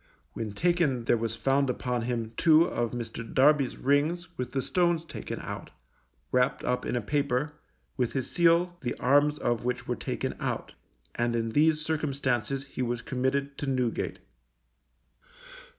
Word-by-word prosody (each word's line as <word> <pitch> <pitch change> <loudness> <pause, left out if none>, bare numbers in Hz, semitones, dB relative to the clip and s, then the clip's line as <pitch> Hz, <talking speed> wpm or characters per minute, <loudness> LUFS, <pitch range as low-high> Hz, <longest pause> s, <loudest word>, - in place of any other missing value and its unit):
When 110 -3 -4
taken 165 - +1
there 120 - +3
was 115 -1 -2
found 135 +3 +2
upon 125 -1 -1
him 115 -1 -2
two 160 +2 +6
of 120 -7 -1
Mr. 115 -1 -5
Darby's 140 -1 +4
rings 150 +6 +1
with 125 -5 -4
the 135 - 0
stones 170 -2 +1
taken - - -6
out, - - -6 0.6
wrapped 125 0 +2
up 125 0 -1
in - - -1
a 120 - 0
paper, 145 +3 0 0.4
with 125 -3 0
his 130 -2 -1
seal 175 +1 +3
the 120 - -2
arms 145 +3 +3
of 120 -5 -1
which 125 +1 -2
were - - 0
taken - - -3
out, - - -3 0.4
and 120 0 0
in 115 -1 0
these 155 +5 +3
circumstances 140 -4 -1
he 135 - -6
was 120 -1 -2
committed 140 +2 -1
to 145 - -3
Newgate. 125 -3 -1
130 Hz, 155 wpm, -28 LUFS, 120-150 Hz, 0.6 s, two